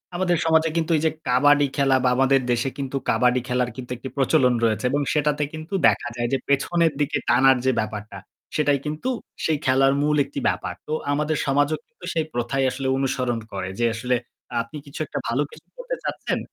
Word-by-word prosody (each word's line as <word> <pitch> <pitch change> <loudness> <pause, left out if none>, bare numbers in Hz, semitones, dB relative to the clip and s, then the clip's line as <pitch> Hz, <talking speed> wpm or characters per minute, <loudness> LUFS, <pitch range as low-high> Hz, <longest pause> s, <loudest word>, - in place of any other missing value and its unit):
আমাদের 175 -2 +1
সমাজে 160 0 +3
কিন্তু 165 0 0
এইযে 160 +1 +1 0.2
কাবাডি 145 +3 +4
খেলা 135 -2 +3
বা 125 - +4
আমাদের 135 +1 +3
দেশে 120 +3 +1
কিন্তু 135 -1 -3
কাবাডি 125 +3 +3
খেলার 125 -1 0
কিন্তু 125 -1 -8
একটি 130 +2 -7
প্রচলন 125 -1 +3
রয়েছে। 110 0 +1
এবং 145 +1 +1
সেটাতে 150 -1 +1
কিন্তু 155 +5 -8
দেখা - - +1
যায় 120 0 -1
যে - - +4
পেছনের 160 +3 +2
দিকে 145 +1 +1
টানার 130 +2 +5
যে 130 - +4
ব্যাপারটা 105 -1 -5 0.4
সেটাই 145 -2 +2
কিন্তু 155 +12 -3 0.4
সেই 160 -2 +2
খেলার 135 +1 +4
মূল 150 +1 +2
একটি 140 0 -6
ব্যাপার। 90 - -1
তো 155 - -2 0.2
আমাদের 150 +1 0
সমাজও 145 +2 +2
কিন্তু 215 -6 -14
সেই 160 -2 0
প্রথাই 120 +3 -1
আসলে 130 +1 -3
অনুসরণ 125 -3 -1
করে। 95 -1 -4
যে 120 - +2
আসলে 125 +3 0 0.5
আপনি 115 +6 -8
কিছু 140 +2 -9
একটা - - -4
ভালো 120 +5 +1
কিছু - - -16
করতে - - -4
চাচ্ছেন? - - -2
135 Hz, 190 wpm, -23 LUFS, 125-150 Hz, 0.5 s, টানার